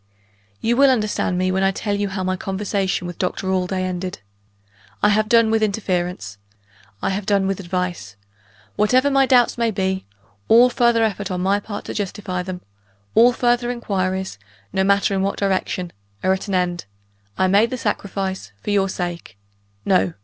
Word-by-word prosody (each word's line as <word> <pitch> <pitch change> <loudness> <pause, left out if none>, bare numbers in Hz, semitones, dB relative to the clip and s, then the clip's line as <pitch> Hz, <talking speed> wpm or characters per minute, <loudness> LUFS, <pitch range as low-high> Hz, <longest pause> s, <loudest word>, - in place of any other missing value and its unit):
"You 235 +1 +1
will 275 0 +6
understand 215 -6 0
me 185 0 +1
when 190 +1 0
I 195 - +4
tell 205 +2 -2
you 205 0 -1
how 190 0 -3
my 185 0 0
conversation 195 -1 -2
with 175 -1 -7
Doctor 185 +1 -2
Allday 185 0 0
ended. 185 0 -3 0.9
I 210 - +6
have 215 +1 +2
done 230 -2 +5
with 225 0 +2
interference; 180 - -2 0.6
I - - +1
have 195 +1 -3
done 200 -2 +2
with 195 0 -1
advice. 180 - -3 0.6
Whatever 255 +7 +3
my 270 -1 +4
doubts 245 -2 +4
may 230 -1 +2
be, 190 - -2 0.4
all 245 +2 +6
further 235 -2 +3
effort 205 -2 -1
on 180 -1 -2
my 195 +2 +2
part 205 0 -7
to - - -5
justify 195 -2 -3
them 180 0 -6 0.5
all 240 +2 +6
further 240 0 +1
inquiries, 190 - -2 0.3
no 190 - +2
matter 200 +1 +2
in 190 - 0
what 195 +1 -1
direction 185 -2 -1 0.3
are 190 - +3
at 190 +2 -4
an 195 - -1
end: 175 -1 -1 0.5
I 190 - +3
made 200 +5 +4
the 255 - -3
sacrifice, 195 - -3
for - - -2
your 195 -1 +2
sake. 175 - -5 0.5
No! 90 -2 +2
195 Hz, 175 wpm, -21 LUFS, 185-215 Hz, 0.9 s, will